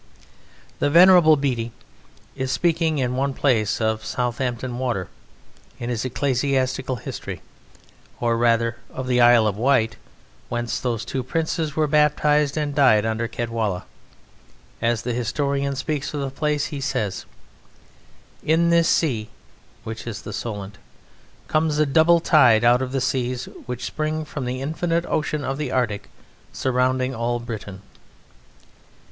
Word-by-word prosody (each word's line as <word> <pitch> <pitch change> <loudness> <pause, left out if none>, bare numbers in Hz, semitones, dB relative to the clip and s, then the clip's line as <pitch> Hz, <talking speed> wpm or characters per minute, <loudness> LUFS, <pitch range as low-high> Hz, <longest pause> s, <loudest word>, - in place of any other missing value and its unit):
The - - +2
Venerable 175 -1 +7
Bede 125 -4 -1 0.6
is 130 0 -2
speaking 165 -2 +1
in 125 -2 -1
one 135 +1 -1
place 115 -7 +1
of 110 -1 0
Southampton 125 0 -2
Water, 120 -9 -2 0.7
in 120 -1 -4
his 115 -2 -2
ecclesiastical 130 0 0
history, 115 - -7 0.8
or, 120 -1 +1
rather, 115 0 +2
of 130 - -6
the 125 -1 +2
Isle 120 -2 +6
of 105 -2 0
Wight, 115 -2 +2 0.5
whence 120 -1 -2
those 115 -3 -2
two 135 - -3
Princes 160 +2 -2
were 155 - +2
baptized 150 -1 +2
and 150 -2 -1
died 125 -7 +4
under 110 +1 -1
Cadwalla. 115 -5 -2 1.0
As 115 -1 0
the 125 - -2
historian 140 +3 -1
speaks 150 +1 -3
of 145 - -2
the 135 -1 -3
place 150 +1 -1
he 140 - -4
says: 105 -7 -2 1.1
"In 170 +2 +2
this 170 0 +4
sea" 115 -9 +1 0.5
(which 115 +1 -7
is 105 -3 -6
the 105 - -7
Solent) 100 -2 -6 0.7
"comes 155 -1 +1
a 155 - +3
double 160 +4 +4
tide 125 -10 +5
out 120 +2 +5
of 130 -1 -3
the 135 -1 -1
seas 130 -1 -1 0.2
which 125 -1 -4
spring 155 0 -2
from 145 -3 -5
the 130 +2 -3
infinite 165 +3 -1
ocean 155 -2 -1
of 135 +1 -3
the 145 -4 -3
Arctic 110 -6 -1 0.4
surrounding 130 0 0
all 120 0 -1
Britain." 105 -5 -7
130 Hz, 140 wpm, -23 LUFS, 115-150 Hz, 1.1 s, Venerable